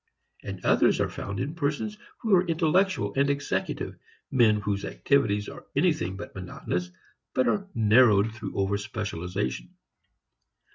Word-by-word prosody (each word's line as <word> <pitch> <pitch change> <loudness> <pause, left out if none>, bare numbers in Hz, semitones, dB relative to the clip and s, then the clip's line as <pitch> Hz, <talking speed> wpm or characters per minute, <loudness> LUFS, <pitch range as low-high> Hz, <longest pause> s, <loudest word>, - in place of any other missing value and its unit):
And - - -7
others - - +4
are - - 0
found 100 -1 -5
in 140 +4 -2
persons 165 +7 -2 0.2
who 220 -5 +3
are 180 0 +3
intellectual 175 +4 +2
and 140 +1 +3
executive, 140 0 -2 0.3
men 110 -4 +4
whose 100 -1 -2
activities 105 -5 +1
are - - -10
anything 90 +2 +1
but 105 - -8
monotonous, 90 -1 -4 0.5
but 130 - +3
are 200 -1 0
narrowed 110 -1 +5
through 110 -3 -7
over 100 +1 +1
specialization. 90 - -4
110 Hz, 135 wpm, -27 LUFS, 100-145 Hz, 0.5 s, narrowed